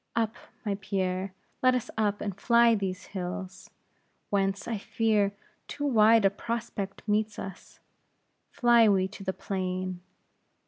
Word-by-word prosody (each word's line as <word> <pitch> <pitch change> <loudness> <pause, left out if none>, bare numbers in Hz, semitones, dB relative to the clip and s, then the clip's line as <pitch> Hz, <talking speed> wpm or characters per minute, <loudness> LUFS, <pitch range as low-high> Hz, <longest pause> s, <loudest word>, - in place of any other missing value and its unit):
Up, 225 -1 +1 0.3
my 200 -1 -1
Pierre; 190 -1 -1 0.3
let 255 0 +5
us 250 0 -3
up, 210 -2 0
and 200 -3 -3
fly 235 -1 +5
these 195 -3 -2
hills, 185 0 -5 0.6
whence, 195 -1 0
I 225 -3 -2
fear, 210 -1 +1 0.4
too 290 - -4
wide 225 -4 +5
a 195 - +5
prospect 215 -2 -4
meets 210 0 +1
us. 190 -1 -9 0.7
Fly 235 -2 +5
we 190 -2 +3
to 195 - -10
the 190 - -1
plain. 185 -1 -3
200 Hz, 135 wpm, -28 LUFS, 190-225 Hz, 0.7 s, let